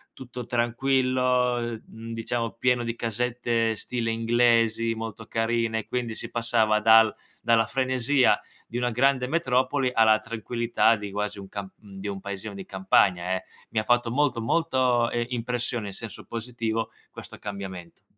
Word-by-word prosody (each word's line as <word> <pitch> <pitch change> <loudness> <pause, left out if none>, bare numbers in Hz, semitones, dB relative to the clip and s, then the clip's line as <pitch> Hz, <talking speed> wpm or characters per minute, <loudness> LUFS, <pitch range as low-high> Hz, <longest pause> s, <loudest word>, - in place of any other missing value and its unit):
tutto 125 -2 -8
tranquillo, 125 +1 +1 0.3
mhmm, 115 +1 -8
diciamo, 115 0 -2
pieno 125 0 +1
di 115 0 -3
casette 115 0 0
stile 115 +1 -2
inglesi 115 0 +2
molto 115 0 -6
carine, 115 0 -1
quindi 120 -2 -2
si 115 - -6
passava 115 -2 +2
dal 110 0 +6 0.3
dalla 115 -1 +3
frenesia 130 +1 +2 0.3
di 120 - -5
una 125 0 0
grande 130 +1 +2
metropoli 130 -3 +1
alla 110 -1 +5
tranquillità 115 0 +1
di 105 -1 -6
quasi 105 0 -3
un 95 -1 -10
cam 100 -2 -6
di 100 -1 -9
un 100 -1 -4
paesino 100 +1 -6
di 100 -1 -7
campagna, 95 -1 +2
eh. 95 0 -2 0.3
Mi 110 - +1
ha 110 - -1
fatto 120 0 +2
molto, 130 -3 +1
molto, 125 -3 +2
ehm, 120 0 -1
impressione, 120 -2 -2
in 100 - -6
senso 115 +2 -8
positivo, 115 -1 -3 0.2
questo - - -10
cambiamento. 95 -4 -8
115 Hz, 150 wpm, -26 LUFS, 110-125 Hz, 0.3 s, dal